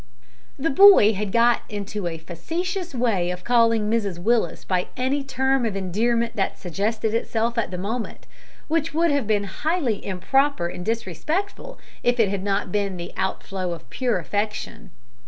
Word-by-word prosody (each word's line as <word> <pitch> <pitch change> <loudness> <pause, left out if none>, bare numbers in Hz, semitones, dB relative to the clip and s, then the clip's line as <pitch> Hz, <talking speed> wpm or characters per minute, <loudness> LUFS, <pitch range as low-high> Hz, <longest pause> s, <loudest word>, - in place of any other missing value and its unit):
The 290 +3 0
boy 385 - +8
had 205 0 -3
got 235 +2 +4
into 205 -2 -4
a 165 -1 -4
facetious 335 - -4
way 215 -8 +1
of 180 0 -5
calling 230 -3 +3
Mrs 210 -5 0
Willis 225 +6 0
by 180 -1 0
any 270 +3 0
term 265 -1 +1
of 220 -4 -1
endearment 230 +5 0
that 195 - -1
suggested 210 +5 -2
itself 230 0 0
at 230 - 0
the 180 - -5
moment, 220 +6 -4 0.4
which 325 0 -1
would 335 0 +3
have 285 -6 0
been 210 -2 +2
highly 255 - -1
improper 235 +3 +1
and 175 0 -6
disrespectful 305 - -3 0.2
if 245 0 +1
it 215 -4 +4
had 195 -1 -2
not 195 -1 -1
been 200 -2 -1
the 175 +1 -7
outflow 190 -1 -3
of 170 - -10
pure 250 -5 0
affection. 210 +3 -3
220 Hz, 160 wpm, -23 LUFS, 195-260 Hz, 0.4 s, boy